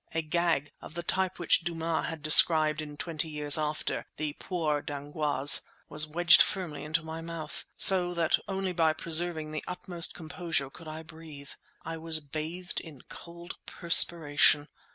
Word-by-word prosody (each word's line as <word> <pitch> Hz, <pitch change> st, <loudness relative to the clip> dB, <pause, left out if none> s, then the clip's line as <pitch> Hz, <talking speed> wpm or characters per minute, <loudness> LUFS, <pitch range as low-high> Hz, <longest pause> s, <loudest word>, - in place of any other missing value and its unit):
A 165 Hz, -, -1 dB
gag, 160 Hz, -2 st, -2 dB
of 155 Hz, -, -13 dB
the 170 Hz, -, -5 dB
type 190 Hz, +1 st, -2 dB
which 175 Hz, -, +2 dB
Dumas 165 Hz, -1 st, -4 dB
has 165 Hz, -, -6 dB
described 155 Hz, 0 st, +4 dB
in 150 Hz, -1 st, -10 dB
"Twenty 160 Hz, 0 st, -4 dB
Years 150 Hz, -1 st, +4 dB
After," 155 Hz, 0 st, -4 dB
the 150 Hz, -1 st, -4 dB
poire 155 Hz, -5 st, -3 dB
d'angoisse, 145 Hz, -1 st, +3 dB, 0.3 s
was 150 Hz, +1 st, +2 dB
wedged 170 Hz, +2 st, +5 dB
firmly 175 Hz, -7 st, -2 dB
into 155 Hz, +2 st, -2 dB
my 160 Hz, +1 st, -8 dB
mouth, 165 Hz, -1 st, -6 dB
so 180 Hz, -2 st, +6 dB
that 165 Hz, -2 st, 0 dB
only 190 Hz, -1 st, -4 dB
by 165 Hz, -2 st, +1 dB
preserving 160 Hz, -1 st, 0 dB
the 155 Hz, -, -6 dB
utmost 175 Hz, -2 st, -6 dB
composure 160 Hz, -4 st, -3 dB
could 165 Hz, +2 st, -14 dB
I 155 Hz, +1 st, -9 dB
breathe. 160 Hz, -4 st, -13 dB, 0.3 s
I 165 Hz, 0 st, -6 dB
was 160 Hz, 0 st, -4 dB
bathed 160 Hz, +5 st, -7 dB
in 150 Hz, -6 st, -14 dB
cold 170 Hz, +1 st, -12 dB
perspiration. 150 Hz, -3 st, +3 dB
160 Hz, 155 wpm, -27 LUFS, 150-170 Hz, 0.3 s, so